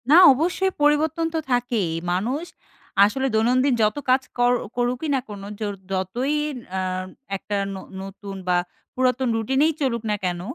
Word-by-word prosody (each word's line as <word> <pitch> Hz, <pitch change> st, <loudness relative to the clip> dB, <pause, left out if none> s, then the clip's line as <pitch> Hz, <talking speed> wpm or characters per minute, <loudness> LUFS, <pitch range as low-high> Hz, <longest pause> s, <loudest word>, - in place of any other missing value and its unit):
না, 310 Hz, -, +8 dB, 0.2 s
অবশ্যই 360 Hz, +7 st, 0 dB
পরিবর্তন 295 Hz, +2 st, +3 dB
তো 325 Hz, -, +1 dB
থাকেই। 240 Hz, -7 st, +1 dB, 0.2 s
মানুষ 240 Hz, -, -1 dB, 0.6 s
আসলে 265 Hz, +6 st, 0 dB
দৈনন্দিন 250 Hz, +5 st, +3 dB
যত 215 Hz, +2 st, +2 dB
কাজ 260 Hz, +1 st, +5 dB, 0.2 s
কর 245 Hz, 0 st, +4 dB, 0.3 s
করুকই 245 Hz, +5 st, 0 dB
না -, -, +2 dB
কেনো, 200 Hz, -2 st, -8 dB
জোর 210 Hz, -2 st, -2 dB, 0.2 s
যতই 215 Hz, +10 st, -1 dB, 0.4 s
আ -, -, +1 dB, 0.6 s
একটা 205 Hz, +2 st, -4 dB, 0.2 s
ন -, -, -6 dB, 0.3 s
নতুন 195 Hz, +1 st, -8 dB
বা 180 Hz, -1 st, +3 dB, 0.4 s
পুরাতন 255 Hz, 0 st, +1 dB
রুটিনেই 265 Hz, +8 st, +2 dB
চলুক 235 Hz, -5 st, 0 dB
না -, -, +2 dB
কেন, 175 Hz, -1 st, -1 dB
245 Hz, 150 wpm, -23 LUFS, 205-270 Hz, 0.6 s, না